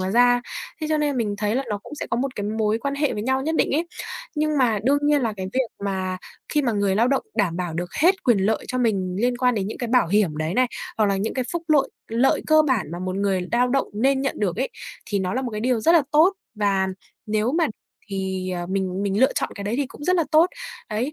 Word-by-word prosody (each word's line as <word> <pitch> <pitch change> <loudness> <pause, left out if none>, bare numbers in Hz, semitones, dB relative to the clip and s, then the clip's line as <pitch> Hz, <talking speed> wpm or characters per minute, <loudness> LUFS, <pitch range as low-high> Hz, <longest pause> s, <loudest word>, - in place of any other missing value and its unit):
mà 185 +1 -1
ra. 245 +2 +5 0.4
Thế 310 - -2
cho 310 - +3
nên 290 -3 0
mình 210 -4 0
thấy 210 +1 0
là 270 - +1
nó 205 - -1
cũng 295 - -10
sẽ - - -5
có - - +1
một 265 +1 -2
cái 205 - -3
mối 215 +1 +1
quan 280 +3 -2
hệ 290 0 0
với 210 - -3
nhau 265 +2 +1
nhất 320 +2 -1
định - - +2
ấy. 335 +3 0 0.5
Nhưng 305 -1 +1
mà 230 -5 +3
đương 285 +2 +4
nhiên 290 -2 +3
là 225 -2 0
cái 190 -1 -4
việc 260 -2 +1 0.2
mà 185 -1 -2 0.3
khi 295 -1 +1
mà 240 -3 +1
người 200 -2 +1
lao 235 +3 +3
động 275 - +1
đảm 180 -6 +1
bảo 175 -3 -3
được 175 +1 -3
hết 375 +4 +4
quyền 240 -5 +4
lợi 200 +3 0
cho 255 - -2
mình 190 -6 0
liên 245 0 +1
quan 250 -1 +2
đến 195 -2 -1
những 215 - -6
cái 240 - -3
bảo 245 -5 +4
hiểm 190 -6 +2
đấy 155 +4 -2
này, 255 0 +4 0.3
hoặc 215 - +4
là 195 -1 +1
những 205 +3 -2
cái 255 -2 -1
phúc 340 -1 -2
lội 290 -3 +3 0.2
lợi 235 +4 +2
cơ 310 0 +6
bản 260 -8 +1
mà 175 - -4
một 185 +1 -3
người 190 -2 0
lao 245 +1 +3
động 270 +2 +1
nên 265 +5 +2
nhận 275 - -2
được 185 -5 0
ấy, 260 +3 -1 0.4
thì 205 -2 -1
nó 185 +3 -1
là 260 - -1
một 245 - -3
cái 210 -1 -4
điều 245 -1 +1
rất 330 - +4
là 335 - +6
tốt. 325 +6 +6 0.2
Và 200 -2 +1 0.4
nếu 215 +3 0
mà 325 - +3 0.4
thì, 190 -2 -3
ờ, 175 -1 -3
mình 190 0 -2
mình 200 +2 0
lựa 265 - +5
chọn - - -1
cái 200 - -6
đấy 210 +3 -1
thì 280 -1 0
cũng 290 - -11
rất 365 0 +3
là 335 - +2
tốt, 315 +3 +6 0.4
đấy. 240 +8 -1
230 Hz, 275 wpm, -23 LUFS, 195-270 Hz, 0.5 s, cơ